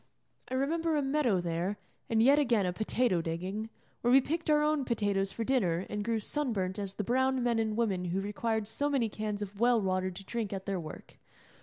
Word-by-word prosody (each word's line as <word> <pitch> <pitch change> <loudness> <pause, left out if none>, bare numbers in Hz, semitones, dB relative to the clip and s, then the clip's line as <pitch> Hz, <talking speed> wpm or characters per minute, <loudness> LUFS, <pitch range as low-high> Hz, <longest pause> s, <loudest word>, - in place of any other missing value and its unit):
I 260 - -2
remember 320 +4 +1
a 295 - +1
meadow 270 -9 +2
there, 175 +4 -2 0.3
and 225 -1 +3
yet 280 +4 +6
again 235 -8 +2
a 180 - -1
potato 215 -2 +1
digging, 185 +7 -4 0.3
where 240 - +2
we 265 - +8
picked 320 +5 -2
our 300 0 +4
own 300 -2 +2
potatoes 205 -5 0
for 230 - -3
dinner 195 -9 +1
and 210 0 -2
grew 225 0 0
sun 275 +3 -2
burnt 190 0 -2
as 195 -1 -5
the 210 - -2
brown 260 +3 +1
men 235 -2 +2
and 220 -1 -1
women 195 -6 0
who 180 +2 -1
required 210 +2 -1
so 285 +6 -1
many 260 -6 +1
cans 210 -1 -3
of 200 0 -9
well 240 0 +4
water 185 -2 0
to 185 +2 -9
drink 220 -2 -3
at 190 -1 -5
their 195 -2 -1
work. 155 -2 -9
220 Hz, 215 wpm, -31 LUFS, 195-255 Hz, 0.3 s, we